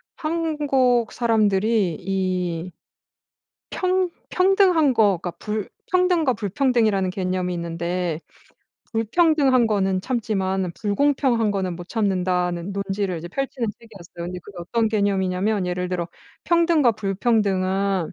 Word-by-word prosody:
한국 295 -7 +1
사람들이 215 -5 +1
이 185 -2 -2 1.0
평 370 -1 +1 0.2
평등한 365 -6 +4
거가 195 -6 +2
불 210 -1 -3 0.2
평등과 360 -6 +3
불평등이라는 220 -3 +1
개념이 185 -1 -2
있는데 170 0 -2 0.7
불평등한 260 +2 +3
거는 195 -3 0
참지만 195 -6 -1
불공평한 235 +1 +1
거는 190 -3 -2
못 175 +1 -9
참는다는 180 -3 -1
논지를 195 -1 -2
이제 165 +1 -7
펼치는 260 +3 -3
책이었어요. 180 -6 -10
근데 180 +1 -5
그게 195 -1 -12
어떤 225 +6 0
개념이냐면 200 -1 0
예를 180 0 -2
들어 175 -2 -2 0.4
평등과 335 -7 +3
불평등은 195 -3 0
200 Hz, 280 characters per minute, -23 LUFS, 185-245 Hz, 1.0 s, 평등한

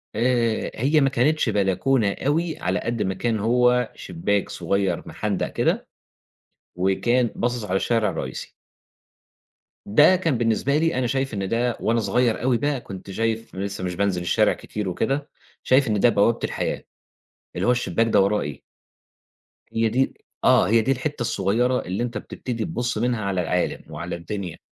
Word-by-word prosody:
آآ 115 -2 +1
هي 145 +6 +2
ما 135 - +4
كانتش 140 +1 +2
بلكونة 105 +2 +1
أوي 160 +3 0
على 90 +1 0
قد 115 +1 -3
ما 95 - 0
كان 110 +3 -1
هو 125 +2 +2
شِباك 95 +3 -2
صغير 95 0 -1
محندق - - -2
كده، - - 0 0.9
وكان 105 +7 +2
باصص 120 -1 -1
على 95 -2 -1
الشارع 110 +1 +1
الرئيسي. - - -6 1.3
ده 150 - +6
كان 165 -8 0
بالنسبة 120 +5 +1
لي 165 +2 +1
أنا 130 -1 0
شايف 135 0 -1
إن 100 -2 -2
ده 120 0 0
وأنا 115 +1 +1
صغير 115 +2 +1
أوي 125 -1 +3
بقى 145 0 -1
كُنت 95 -2 -9
شايف، 115 +1 -2
أنا 95 - -3
لسه 100 -1 -4
مش 90 -1 -3
بانزل 95 -2 0
الشارع 85 - +2
كتير 105 -3 -5
وكده، 140 - -1 0.3
شايف 135 +1 +4
إن 105 -2 +1
ده 120 - +5
بوابة 115 +2 +2
الحياة، - - -2 0.7
اللي - - -1
هو - - +5
الشِباك 120 -1 +1
ده 105 -3 +4
وراه 100 +2 +2
إيه! 75 -2 -6 1.1
هي 115 0 +2
دي 130 +4 +1 0.3
آه - - +5
هي 115 +1 +4
دي 115 - 0
الحتة 135 +1 -2
الصغيرة 120 +4 +1
اللي 95 +6 -3
أنت 120 -2 -3
بتبتدي 115 +2 -5
تبُصّ 125 -9 -2
منها 115 -2 0
على 95 -2 0
العالم 90 +1 -1
وعلى 85 +4 -4
الدنيا 90 +1 -6
115 Hz, 165 wpm, -23 LUFS, 100-125 Hz, 1.3 s, ده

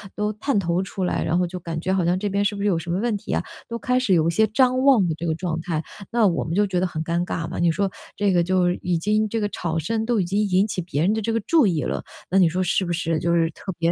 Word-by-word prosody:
都 210 0 -1
探 215 +2 0
头 175 0 0
出 190 0 -5
来， 180 - 0
然 170 - +1
后 180 - +1
就 180 +1 -6
感 165 -2 -5
觉 185 - -1
好 185 -3 +1
像 175 +1 +2
这 205 +1 -2
边 200 +1 0
是 205 0 0
不 200 - -5
是 205 - +1
有 180 - +2
什 170 +1 -4
么 180 - 0
问 225 -2 0
题 210 - -5
啊， - - +1 0.3
都 235 0 -5
开 255 0 +1
始 235 -7 +1
有 165 -2 +3
一 170 - +2
些 220 +6 +3
张 255 +3 +2
望 255 -9 +5
的 160 - -1
这 165 - -6
个 160 - +1
状 165 0 -3
态。 160 -2 -2 0.3
那 230 -3 +4
我 170 - 0
们 160 - -4
就 205 +2 +2
觉 180 -2 0
得 185 - +1
很 160 -3 -3
尴 170 +2 -1
尬 165 -2 -3
嘛， 175 - -6
你 170 -1 +3
说 195 +4 0 0.3
这 205 -1 +1
个 175 -1 +3
就 180 0 +2
已 175 -1 -1
经 215 +4 +1
这 225 +2 -2
个 205 -1 -1
吵 165 -4 -2
声 220 +7 -1
都 240 -2 +1
已 185 - +1
经 200 +4 0
引 190 +3 +2
起 190 - -4
别 165 -4 -2
人 185 +6 +3
的 220 -1 -2
这 225 - -1
个 230 - +1
注 320 +4 +3
意 165 -6 +1
了， - - -3 0.3
那 190 - +2
你 180 -3 +6
说 180 +3 -1
是 185 +1 +1
不 175 - -2
是 165 -1 -1
就 170 +1 0
是 165 -1 +2
特 190 +5 -7
别 165 0 +2
185 Hz, 345 characters per minute, -23 LUFS, 170-210 Hz, 0.3 s, 你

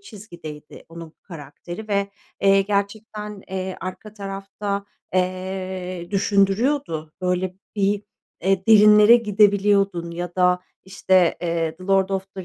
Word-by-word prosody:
çizgideydi 170 - -11
onun 165 -1 -10
karakteri 175 +5 -9
ve, 200 -1 0 0.3
eee, 195 0 +5
gerçekten, 210 +1 -4
eee, 190 0 -4
arka 185 +3 -7
tarafta, 200 0 -5 0.3
eee, 185 -1 -3
düşündürüyordu. 200 - +1
Böyle 180 0 -1 0.2
bir, 200 0 +1 0.4
eee, 190 +1 +1
derinlere 210 +1 +8
gidebiliyordun 200 -4 +2
ya 175 +1 -5
da, 180 -1 +3 0.2
işte, 185 -2 +2
eee, 165 -2 -2
The 185 - -12
Lord 195 0 +2
of 195 0 -4
The 190 -1 -7
195 Hz, 115 wpm, -22 LUFS, 180-205 Hz, 0.4 s, derinlere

